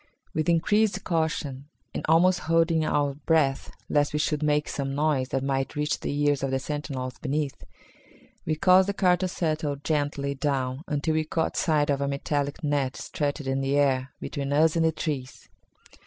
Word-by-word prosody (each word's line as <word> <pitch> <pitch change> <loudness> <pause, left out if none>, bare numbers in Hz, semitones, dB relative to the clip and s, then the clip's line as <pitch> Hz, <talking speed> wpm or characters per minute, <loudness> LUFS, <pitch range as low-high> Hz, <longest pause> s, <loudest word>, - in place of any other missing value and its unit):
With 155 +1 0
increased 195 +4 +2
caution, 155 -5 -2 0.3
and - - -4
almost 180 +3 +5
holding 165 -1 +3
our 145 -2 +1
breath 145 -2 +1 0.2
lest 145 0 +1
we - - +1
should 150 0 0
make 150 0 +1
some 135 -1 -3
noise 145 -3 +1
that 135 - -1
might 135 -1 -1
reach 150 +1 -1
the - - -3
ears 145 -2 +2
of 135 - -1
the 135 - +1
sentinels 135 -2 -4
beneath, 145 -1 -2 0.8
we 155 - -1
caused 185 +3 +5
the 200 - -2
car 180 -2 +4
to 185 +1 -1
settle 155 -4 -1
gently 145 -1 -1
down 135 -2 -1
until 150 +1 0
we 155 0 +1
caught 160 +1 -1
sight 150 -3 +2
of 140 0 0
a 140 - 0
metallic 140 +2 -2
net 145 -3 0
stretched 145 -1 -3
in 135 -1 -1
the 135 +1 +1
air 135 -2 +2
between 140 0 -4
us 155 +3 +4
and 165 -1 +2
the 160 - +3
trees. 140 -6 -5
145 Hz, 180 wpm, -26 LUFS, 140-160 Hz, 0.8 s, almost